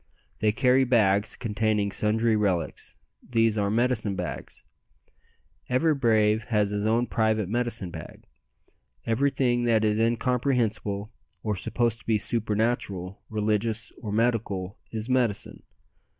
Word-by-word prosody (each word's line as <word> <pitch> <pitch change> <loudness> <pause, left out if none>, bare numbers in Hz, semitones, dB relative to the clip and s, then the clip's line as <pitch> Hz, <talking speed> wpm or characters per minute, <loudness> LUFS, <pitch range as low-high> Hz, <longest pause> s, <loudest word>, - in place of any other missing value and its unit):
They 105 0 +3
carry 125 +4 +3
bags 105 -5 +2
containing 105 -2 0
sundry 110 +2 +1
relics; 95 -6 -1 0.3
these 115 -2 +1
are 100 -2 0
"medicine 110 -2 +1
bags." - - -6 1.1
Every 155 +6 +3
brave 110 -5 +2
has 105 -3 +1
his 105 +1 -1
own 115 +2 +2
private 110 -4 0
medicine 115 -4 -2
bag. 80 -2 -10 0.8
Everything 120 0 +1
that 110 -2 +3
is 105 0 +1
incomprehensible, 115 -3 0 0.3
or 105 -2 -1
supposed 115 +4 0
to - - -21
be 110 -2 +3
supernatural, 105 -4 -1
religious, 110 +1 -1
or 105 - -5
medical, 105 -4 -1
is 110 0 -4
"medicine." 120 -5 0
110 Hz, 120 wpm, -26 LUFS, 105-120 Hz, 1.1 s, They